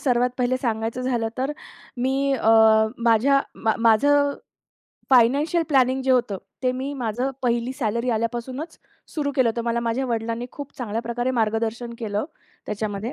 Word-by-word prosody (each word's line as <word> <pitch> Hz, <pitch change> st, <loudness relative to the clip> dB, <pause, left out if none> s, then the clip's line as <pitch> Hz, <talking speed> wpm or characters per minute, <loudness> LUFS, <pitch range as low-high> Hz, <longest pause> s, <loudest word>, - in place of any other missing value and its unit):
सर्वात 250 Hz, -2 st, +2 dB
पहिले 250 Hz, +1 st, +1 dB
सांगायचं 230 Hz, 0 st, -2 dB
झालं 240 Hz, -3 st, 0 dB
तर 270 Hz, +3 st, -1 dB, 0.5 s
मी 265 Hz, +1 st, +1 dB, 0.2 s
अ, 225 Hz, -3 st, +2 dB, 0.6 s
माझ्या 275 Hz, +5 st, +4 dB, 0.2 s
मा 220 Hz, -, +3 dB
माझं 285 Hz, +6 st, +4 dB, 0.8 s
फायनान्शियल 280 Hz, +7 st, +4 dB
प्लॅनिंग 265 Hz, -2 st, +3 dB
जे 265 Hz, -, 0 dB
होतं 240 Hz, -6 st, +2 dB, 0.2 s
ते 255 Hz, -1 st, +2 dB
मी 275 Hz, +2 st, -3 dB
माझं 245 Hz, 0 st, -2 dB
पहिली 240 Hz, +1 st, 0 dB
सॅलरी 235 Hz, -2 st, -1 dB
आल्यापासूनच 240 Hz, +7 st, -3 dB, 0.4 s
सुरू 295 Hz, -3 st, -1 dB
केलं 260 Hz, -3 st, +4 dB
होतं. 230 Hz, +1 st, -2 dB
मला 235 Hz, 0 st, 0 dB
माझ्या 235 Hz, +3 st, -1 dB
वडिलांनी 230 Hz, 0 st, -2 dB
खूप 285 Hz, -1 st, -8 dB
चांगल्या 225 Hz, -2 st, -3 dB
प्रकारे 240 Hz, +2 st, -2 dB
मार्गदर्शन 225 Hz, +2 st, -1 dB
केलं 210 Hz, -1 st, -2 dB, 0.4 s
त्याच्यामध्ये 210 Hz, +2 st, -3 dB
240 Hz, 145 wpm, -23 LUFS, 225-260 Hz, 0.8 s, माझ्या